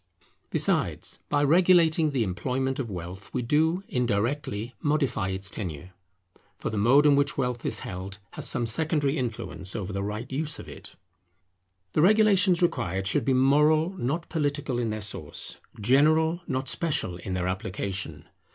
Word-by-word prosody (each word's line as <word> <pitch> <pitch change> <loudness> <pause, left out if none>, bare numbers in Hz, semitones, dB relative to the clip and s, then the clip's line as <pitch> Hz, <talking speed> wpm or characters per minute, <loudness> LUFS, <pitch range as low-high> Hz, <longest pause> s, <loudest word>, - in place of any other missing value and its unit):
Besides, - - +1
by 145 0 +2
regulating 165 0 +4
the 135 -5 0
employment 130 +8 -2
of 125 -4 -3
wealth, 90 +1 -7
we 125 - 0
do, 160 +8 +2
indirectly, 120 0 -1
modify 140 -10 0
its 95 +1 -2
tenure; 90 -3 -5 0.7
for - - -4
the 110 - -3
mode 130 +8 +5
in 145 -1 +6
which 140 +1 +1
wealth 125 -3 -1
is - - 0
held 95 +1 -6
has - - -1
some 120 - +2
secondary 145 +3 +1
influence 115 -7 -3
over 100 -2 -4
the 100 - -2
right 105 +5 -5
use 150 +2 -1
of - - -10
it. - - -11 1.0
The - - +3
regulations 195 -2 +4
required 95 - 0
should 115 +5 +1
be 135 - +2
moral, 150 +5 +4
not 165 -1 -3
political 145 -5 -1
in 115 -2 -1
their 110 0 -3
source; 100 - -7 0.2
general, 155 - +3
not 130 -2 -2
special, 145 - -1
in 90 +1 -5
their 90 0 -1
application. 95 +1 -4
130 Hz, 155 wpm, -27 LUFS, 100-155 Hz, 1.0 s, in